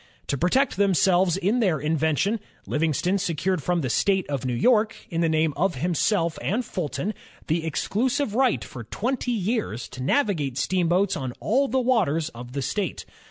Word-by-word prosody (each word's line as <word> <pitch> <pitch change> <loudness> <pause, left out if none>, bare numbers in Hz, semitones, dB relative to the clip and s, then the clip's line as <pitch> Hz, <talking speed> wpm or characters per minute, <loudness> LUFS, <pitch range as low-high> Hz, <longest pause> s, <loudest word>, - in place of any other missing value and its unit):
To - - +1
protect 180 - +1
themselves 190 -2 +3
in 200 +6 +1
their 185 - +2
invention, 160 +8 +1 0.3
Livingston 165 +5 0
secured 180 0 -1
from 175 +3 0
the 130 - -2
State 190 +4 +2
of 135 -2 -2
New 125 -1 -1
York, 220 - +3 0.2
in 165 0 0
the 165 - +2
name 160 -1 +2
of 180 +1 +1
himself 170 - 0
and 230 +6 -1
Fulton, 185 +4 -3 0.3
the 160 +1 0
exclusive 230 - -1
right 260 +2 +2
for 120 - -8
twenty 245 - -2
years 210 - -2
to 130 - -8
navigate 150 - 0
steamboats 185 +4 +1
on 130 -6 -4
all 270 +6 +2
the 265 +2 +1
waters 185 - +1
of 120 -1 -10
the 140 -1 -2
state. 190 +9 -3
180 Hz, 165 wpm, -25 LUFS, 155-210 Hz, 0.3 s, themselves